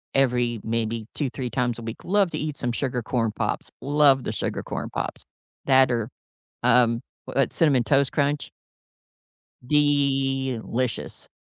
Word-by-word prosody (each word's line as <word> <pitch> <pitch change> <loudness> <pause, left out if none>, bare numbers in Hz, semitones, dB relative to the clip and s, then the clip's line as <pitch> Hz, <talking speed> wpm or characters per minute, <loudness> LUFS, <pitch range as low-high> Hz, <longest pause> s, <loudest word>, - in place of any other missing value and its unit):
every 120 -4 +2
maybe 115 0 -2
2 145 -4 -1
3 125 0 -4
times 120 0 0
a 120 - -8
week, 115 0 -7
love 195 -1 +2
to 155 - -3
eat 150 -2 -3
some 120 - -1
Sugar 125 0 -2
Corn 115 -2 0
Pops. - - -3
Love 140 -2 +4
the - - -2
Sugar - - -3
Corn - - -4
Pops. - - -4 0.4
That 130 -1 +5
or, 115 -2 -1 0.5
um, 115 -2 +4 0.2
what - - 0
Cinnamon 140 -7 +3
Toast 140 0 +2
Crunch. 145 0 0 1.2
Delicious. 135 -4 0
130 Hz, 140 wpm, -25 LUFS, 120-140 Hz, 1.2 s, That